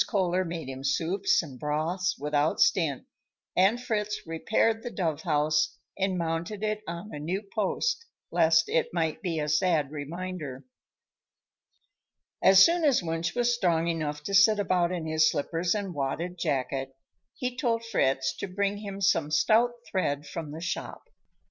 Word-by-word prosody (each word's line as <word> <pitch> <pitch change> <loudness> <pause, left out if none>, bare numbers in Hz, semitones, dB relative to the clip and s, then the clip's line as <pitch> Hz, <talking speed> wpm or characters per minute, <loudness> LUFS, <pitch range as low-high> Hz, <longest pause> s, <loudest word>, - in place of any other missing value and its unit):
Kohler 185 -3 +1
made 165 -4 -5
him 135 0 -7
soups 170 +8 +1
and 135 -6 -10
broths 160 +5 -1
without 150 +1 0
stint, 160 -9 +2 0.5
and 195 +6 +4
Fritz 210 -4 -2
repaired 220 +7 +1
the 240 - -5
dove 160 -8 -2
house 150 -2 +1 0.2
and 190 -1 0
mounted 170 +5 -3
it 215 0 -1
on 170 +5 -6
a 150 - -5
new 180 +7 -3
post, 460 - 0 0.3
lest 160 0 +4
it 160 - +1
might 160 -2 -1
be 175 -4 -2
a 150 -1 -1
sad 155 -2 +2
reminder. 155 -2 -6 1.8
As 190 0 +8
soon 340 0 +2
as 275 - +3
Wunsch 165 0 -2
was 240 0 +2
strong 170 -7 +1
enough 150 -3 -3
to 200 - -4
sit 200 +2 +6
about 180 -3 +1
in 175 -3 -3
his 160 0 +3
slippers 165 +5 -1
and 200 -3 -3
wadded 155 +5 -3
jacket, 135 -3 -2 0.4
he 250 -3 -3
told 230 -3 0
Fritz 135 -10 +1
to - - -4
bring 200 +2 -1
him 200 -1 -7
some 165 -6 +2
stout 225 +9 +3 0.2
thread 145 -6 -1
from 160 0 -6
the 160 +2 -7
shop. 170 - -4
170 Hz, 155 wpm, -28 LUFS, 155-200 Hz, 1.8 s, As